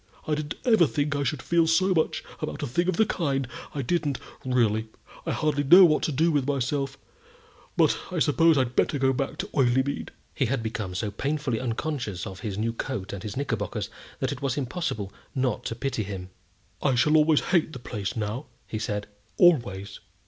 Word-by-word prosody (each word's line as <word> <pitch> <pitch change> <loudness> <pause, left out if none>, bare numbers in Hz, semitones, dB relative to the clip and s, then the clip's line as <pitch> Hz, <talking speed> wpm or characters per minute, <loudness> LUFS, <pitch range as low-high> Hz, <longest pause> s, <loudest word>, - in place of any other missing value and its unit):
I 155 - +1
didn't 150 -1 -2
ever 220 -9 +5
think 145 0 -1
I 145 - 0
should 140 -2 -1
feel 170 +3 +3
so 185 +4 +3
much 160 -3 0 0.2
about - - -4
a - - +1
thing 170 +9 0
of 185 - +1
the 220 - +5
kind 140 -9 -1 0.3
I 140 - -1
didn't, 150 -1 0 0.3
really. 115 -4 +1 0.4
I - - +1
hardly 150 -2 +1
know 180 +7 +9
what 155 -3 +3
to - - 0
do 160 +5 +2
with 145 -3 +1
myself; 135 0 -1 0.8
but - - +4
I 180 - -4
suppose 165 +1 +4
I'd 130 -2 0
better 145 - +2
go 135 -1 +3
back 135 +3 -2
to 195 +3 -4
Oileymead." 130 0 +1 0.2
He 135 - +1
had 120 -1 -1
become 105 -5 -4
so 100 +3 -2
painfully 140 0 -1
unconscious 120 - -3
of 95 -1 -7
his 100 0 -4
new 115 +2 0
coat 115 -5 -4
and 100 - -5
his 105 +1 -6
knickerbockers 115 -8 -2 0.3
that - - -1
it 125 - -6
was 135 -2 -1
impossible 130 - -3 0.2
not 130 -4 0
to 115 - -2
pity 125 -1 -2
him. 95 -3 -6 0.5
"I 135 -3 +2
shall 150 +6 +4
always 155 -1 +5
hate 170 -3 +3
the 135 - -7
place 105 -5 -4
now," 110 +5 -3 0.2
he 110 - -4
said, 105 -2 -2 0.3
"always." 100 - +3
135 Hz, 195 wpm, -26 LUFS, 115-155 Hz, 0.8 s, know